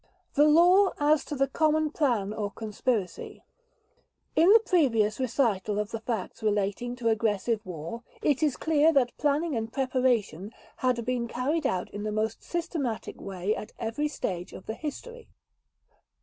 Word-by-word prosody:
The 295 +1 +5
Law 360 +5 +5
as 295 +1 +3
to 295 - -5
the 275 0 +2
Common 310 +1 +1
Plan 235 -10 0
or 210 -2 -3
Conspiracy 215 -1 -3 0.9
In 335 +5 +6
the 450 - +9
previous 230 - +2
recital 225 -6 0
of 210 +1 -2
the 225 - -3
facts 225 -2 -4
relating 210 +3 -1
to 240 -2 -3
aggressive 220 0 0
war, 170 +6 -6 0.2
it 290 -1 +1
is 300 -4 +1
clear 315 0 +3
that 255 -4 +2
planning 295 +1 +1
and 225 0 -3
preparation 245 - 0 0.2
had 250 -3 0
been 245 -1 -1
carried 275 +6 -1
out 185 -8 -2
in 205 - -6
the 215 0 -2
most 215 +1 -2
systematic 325 -9 -4
way 195 +1 -2
at 215 - -8
every 230 +7 -2
stage 180 - -4
of - - -10
the 220 - -4
history. 460 - -7
245 Hz, 155 wpm, -28 LUFS, 215-295 Hz, 0.9 s, the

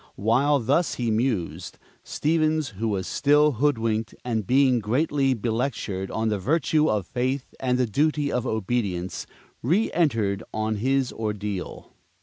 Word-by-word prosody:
While 125 +8 +2
thus 140 +8 +1
he 120 -2 -1
mused, 110 -5 -2 0.3
Stevens, 155 -1 0
who 110 +3 -4
was 100 -4 -1
still 150 +5 +3
hoodwinked 115 -6 0
and 110 -5 -2
being 130 -1 +4
greatly 135 +4 +1
belectured 110 -4 -2
on 110 0 -1
the 105 -2 -1
virtue 155 - +2
of 105 -4 0
Faith 130 +3 -2
and 125 -1 +1
the 125 - +2
duty 145 +5 +1
of 125 +1 -1
Obedience, 100 -5 -2 0.4
reëntered 130 - +1
on 110 0 -1
his 130 +3 0
ordeal. 105 -3 -5
120 Hz, 135 wpm, -25 LUFS, 110-140 Hz, 0.4 s, being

